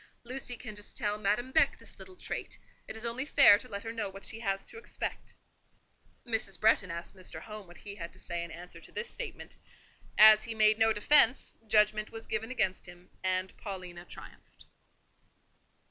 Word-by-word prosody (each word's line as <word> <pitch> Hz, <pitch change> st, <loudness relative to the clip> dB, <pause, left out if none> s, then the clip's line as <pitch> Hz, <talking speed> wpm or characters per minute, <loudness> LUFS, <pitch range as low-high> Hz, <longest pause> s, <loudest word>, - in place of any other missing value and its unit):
Lucy 250 Hz, 0 st, -6 dB
can 215 Hz, -, -8 dB
just 205 Hz, 0 st, -8 dB
tell 210 Hz, -3 st, -1 dB
Madame 215 Hz, +5 st, 0 dB
Beck -, -, +4 dB
this -, -, -13 dB
little 375 Hz, -, -10 dB
trait: -, -, -6 dB, 0.3 s
it -, -, -5 dB
is 220 Hz, +1 st, -6 dB
only 235 Hz, +3 st, -1 dB
fair 275 Hz, -8 st, +7 dB
to 250 Hz, -, -10 dB
let 200 Hz, -4 st, -5 dB
her 225 Hz, -, -4 dB
know 215 Hz, -3 st, -2 dB
what 195 Hz, +1 st, -10 dB
she 225 Hz, -, -4 dB
has 195 Hz, -3 st, -2 dB
to 455 Hz, -, -9 dB
expect." -, -, -5 dB, 0.9 s
Mrs. 220 Hz, -5 st, -1 dB
Bretton 215 Hz, -3 st, +3 dB
asked 170 Hz, +3 st, -6 dB
Mr. 185 Hz, -1 st, -7 dB
Home 215 Hz, -3 st, -8 dB
what 175 Hz, -, -14 dB
he 200 Hz, -, -7 dB
had 170 Hz, -4 st, -7 dB
to -, -, -12 dB
say 170 Hz, -1 st, -4 dB
in 170 Hz, -, -7 dB
answer 170 Hz, +1 st, -9 dB
to -, -, -14 dB
this 470 Hz, 0 st, -4 dB
statement. -, -, -8 dB, 0.6 s
As 215 Hz, 0 st, +9 dB
he 230 Hz, -, -3 dB
made 215 Hz, 0 st, +5 dB
no 225 Hz, 0 st, +5 dB
defence, 235 Hz, +3 st, +3 dB
judgment 215 Hz, 0 st, +3 dB
was 225 Hz, 0 st, -8 dB
given 220 Hz, +1 st, -3 dB
against 200 Hz, -8 st, -1 dB
him, 175 Hz, +1 st, -14 dB
and 185 Hz, 0 st, -1 dB
Paulina 180 Hz, -4 st, -7 dB
triumphed. -, -, -13 dB
210 Hz, 190 wpm, -31 LUFS, 190-225 Hz, 0.9 s, As